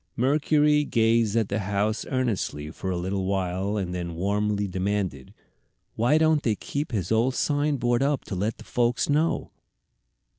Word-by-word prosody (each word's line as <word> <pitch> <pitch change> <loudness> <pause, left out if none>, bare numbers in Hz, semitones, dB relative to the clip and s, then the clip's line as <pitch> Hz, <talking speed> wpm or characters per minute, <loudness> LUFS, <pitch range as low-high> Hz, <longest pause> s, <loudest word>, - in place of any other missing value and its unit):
Mercury 150 +3 +3
gazed 115 -4 +2
at 110 -3 +1
the 100 - -1
house 105 +2 -1
earnestly 110 - -2
for 95 - -5
a 90 - -1
little 95 +2 -2
while 95 +1 -1
and 90 -3 -3
then 85 -2 -4
warmly 100 +3 0
demanded, 95 -7 -2 0.6
"Why 120 +7 +3
don't 155 -1 +3
they 110 -6 +1
keep 145 +7 -4
his 100 -6 -2
old 120 +4 +2
sign 145 0 +1
board 120 0 +1
up 140 0 +1
to 95 - -5
let 105 +5 -3
folks 120 +2 0
know?" 155 +3 +1
110 Hz, 155 wpm, -26 LUFS, 95-130 Hz, 0.6 s, Mercury